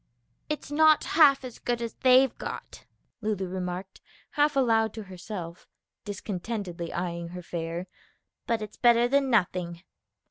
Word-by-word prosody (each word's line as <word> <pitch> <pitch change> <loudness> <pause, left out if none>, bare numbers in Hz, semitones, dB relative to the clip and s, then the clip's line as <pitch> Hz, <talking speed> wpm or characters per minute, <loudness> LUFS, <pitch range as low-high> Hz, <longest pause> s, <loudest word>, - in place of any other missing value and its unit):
"It's 300 -1 -4
not 310 0 +5
half 280 -4 +5
as 245 - -9
good 240 -1 -1
as 230 -1 -4
they've 255 0 +4
got," - - -7 0.4
Lulu 210 -3 -1
remarked 185 +1 -5 0.3
half 295 -1 +2
aloud 225 -5 +2
to 220 - -6
herself, 185 -2 -8 0.4
discontentedly 195 -3 -4
eying 170 -1 -3
her 180 +1 -8
fare, 170 +1 -4 0.6
"but 230 -2 0
it's 210 - -9
better 240 0 +5
than 275 +1 +2
nothing." 180 -6 0
215 Hz, 135 wpm, -27 LUFS, 180-250 Hz, 0.6 s, not